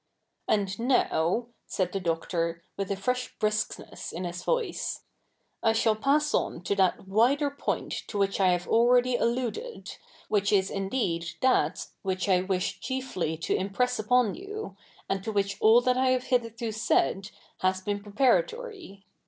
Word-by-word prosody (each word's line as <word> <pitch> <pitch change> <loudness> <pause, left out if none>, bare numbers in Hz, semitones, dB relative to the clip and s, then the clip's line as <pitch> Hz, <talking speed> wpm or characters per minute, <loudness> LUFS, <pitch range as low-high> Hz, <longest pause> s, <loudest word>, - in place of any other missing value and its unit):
^ - - +3
And 205 -2 +2 0.2
?iow,^ 230 0 +2 0.2
said 185 -2 -1
the 195 - -2
Doctor, 165 -1 -2
with 195 -1 -3
a 200 - 0
fresh 250 +6 -2
briskness 215 0 -2
in 175 - -5
his 175 0 -5
voice, 485 -3 -1 0.3
'/ 225 - -2
shall 225 -1 +3
pass 290 +6 +2
on 170 - -1
to 200 - 0
that 190 0 +1
wider 260 +9 +3
poi?tt 285 - -3
to 210 - -5
which 195 0 +1
I 190 - +4
have 180 0 0
already 245 +2 +4
alluded, 250 - -2 0.3
which 205 -1 +1
is 195 -2 +2
indeed 195 -4 -1
that 185 -11 +2 0.2
which 190 0 -2
I 185 -2 +4
wish 185 -1 -1
chiefly 255 - -3
to - - +1
impress 230 +6 0
upo?t 250 - +2
you, 415 +3 -7 0.3
a?id 195 - -1
to 220 - -1
which 200 -1 0
all 225 +2 +7
that 250 +1 +2
I 260 0 +3
have 255 -1 +2
hitherto 230 -2 -1
said 210 -2 +1 0.3
has 185 0 +1
been 205 +1 -2
preparatory. 305 - 0
215 Hz, 160 wpm, -28 LUFS, 190-250 Hz, 0.3 s, all